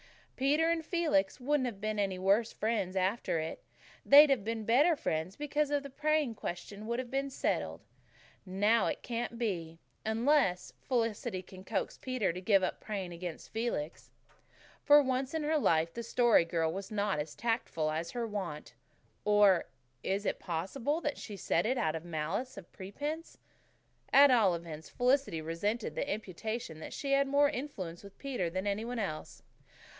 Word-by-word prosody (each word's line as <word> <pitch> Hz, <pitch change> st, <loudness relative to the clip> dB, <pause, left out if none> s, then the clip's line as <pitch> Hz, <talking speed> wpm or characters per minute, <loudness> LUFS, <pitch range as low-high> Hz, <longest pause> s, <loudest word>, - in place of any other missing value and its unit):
Peter 300 Hz, +5 st, +2 dB
and 330 Hz, -1 st, 0 dB
Felix 310 Hz, -, +1 dB
wouldn't 270 Hz, 0 st, +1 dB
have 215 Hz, -5 st, -6 dB
been 215 Hz, 0 st, -2 dB
any 195 Hz, -2 st, 0 dB
worse 200 Hz, +5 st, +2 dB
friends 205 Hz, -4 st, -1 dB
after 190 Hz, 0 st, 0 dB
it. 160 Hz, 0 st, -4 dB, 0.4 s
They'd 290 Hz, +1 st, +8 dB
have 250 Hz, -7 st, +2 dB
been 225 Hz, 0 st, -3 dB
better 290 Hz, +10 st, +4 dB
friends 160 Hz, -, -2 dB
because 295 Hz, 0 st, -1 dB
the 285 Hz, -1 st, -1 dB
praying 305 Hz, -2 st, +1 dB
question 205 Hz, +2 st, -6 dB
would 235 Hz, +1 st, -1 dB
have 255 Hz, -1 st, -5 dB
been 275 Hz, +1 st, -1 dB
settled. 265 Hz, -, -2 dB, 0.6 s
And 190 Hz, 0 st, -7 dB
now 220 Hz, +3 st, +4 dB
it -, -, -3 dB
can't 235 Hz, -1 st, -3 dB
be 170 Hz, -8 st, -3 dB, 0.3 s
unless 220 Hz, -4 st, +2 dB
Felicity 230 Hz, -5 st, -1 dB
can 185 Hz, +1 st, -12 dB
coax 195 Hz, -1 st, -3 dB
Peter 255 Hz, -9 st, -1 dB
to 180 Hz, -, -6 dB
give 195 Hz, 0 st, +4 dB
up 185 Hz, -, -2 dB
praying 195 Hz, -5 st, -4 dB
against 170 Hz, -1 st, -7 dB
Felix." 220 Hz, -9 st, -3 dB, 0.7 s
For 295 Hz, 0 st, +7 dB
once 260 Hz, +2 st, -1 dB
in 320 Hz, -, -1 dB
her 305 Hz, +1 st, +2 dB
life 165 Hz, -, +2 dB
the 235 Hz, -, -4 dB
Story 235 Hz, -5 st, +4 dB
Girl 165 Hz, -1 st, 0 dB
was 195 Hz, 0 st, -5 dB
not 205 Hz, -5 st, 0 dB
as 150 Hz, +1 st, -5 dB
tactful 225 Hz, -9 st, -1 dB
as 160 Hz, +2 st, -3 dB
her 240 Hz, -1 st, -3 dB
wont. 155 Hz, -, -5 dB, 0.5 s
Or 205 Hz, -3 st, +5 dB, 0.4 s
is 200 Hz, +2 st, -1 dB
it -, -, -1 dB
possible 230 Hz, -, -2 dB
that 295 Hz, -, -2 dB
she 205 Hz, -, -7 dB
said 170 Hz, +1 st, +1 dB
it 255 Hz, +2 st, +1 dB
out 180 Hz, -10 st, +1 dB
of 160 Hz, 0 st, -5 dB
malice 175 Hz, +10 st, -3 dB
prepense? 290 Hz, -, -6 dB, 0.7 s
At 280 Hz, 0 st, +8 dB
all 210 Hz, -8 st, +4 dB
events, 160 Hz, -2 st, -8 dB
Felicity 250 Hz, -, +1 dB
resented 205 Hz, +8 st, -2 dB
the -, -, -2 dB
imputation 215 Hz, -2 st, -4 dB
that -, -, -8 dB
she 275 Hz, -, -3 dB
had 275 Hz, 0 st, +4 dB
more 285 Hz, +1 st, +4 dB
influence 200 Hz, -, -6 dB
with 200 Hz, -1 st, -13 dB
Peter 250 Hz, -11 st, -2 dB
than 185 Hz, +3 st, -3 dB
any 205 Hz, +2 st, -1 dB
one 245 Hz, +1 st, -4 dB
else. 175 Hz, -8 st, -5 dB
215 Hz, 170 wpm, -32 LUFS, 185-260 Hz, 0.7 s, They'd